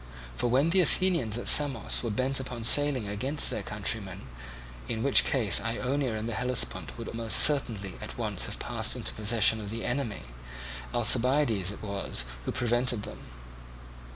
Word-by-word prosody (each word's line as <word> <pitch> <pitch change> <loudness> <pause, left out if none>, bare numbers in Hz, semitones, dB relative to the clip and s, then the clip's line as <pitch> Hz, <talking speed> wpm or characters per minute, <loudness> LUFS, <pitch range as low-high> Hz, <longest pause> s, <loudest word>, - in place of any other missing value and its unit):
For 120 - -2
when 135 +7 +1
the 190 +1 +3
Athenians 165 - 0
at 120 - -5
Samos 145 -3 +5
were 120 - -4
bent 130 +5 -1
upon 125 -3 -7
sailing 135 -2 +4
against 130 +9 -2
their - - -4
countrymen, 100 -3 -5 0.6
in 110 0 -4
which 140 - +4
case 115 -7 +2
Ionia 125 +2 -3
and 110 +1 -5
the 115 - -4
Hellespont 125 +1 -3
would 115 - -8
most 115 -1 +1
certainly 115 -10 +1
at - - -9
once - - -1
have - - -7
passed - - +1
into - - -3
possession 110 0 +2
of 105 - -8
the 115 +2 -6
enemy, 120 - -4 0.7
Alcibiades 120 -4 +3
it 105 - -10
was 100 - -3 0.2
who - - -3
prevented 120 -2 -1
them. 105 - -9
120 Hz, 160 wpm, -27 LUFS, 110-135 Hz, 0.7 s, Samos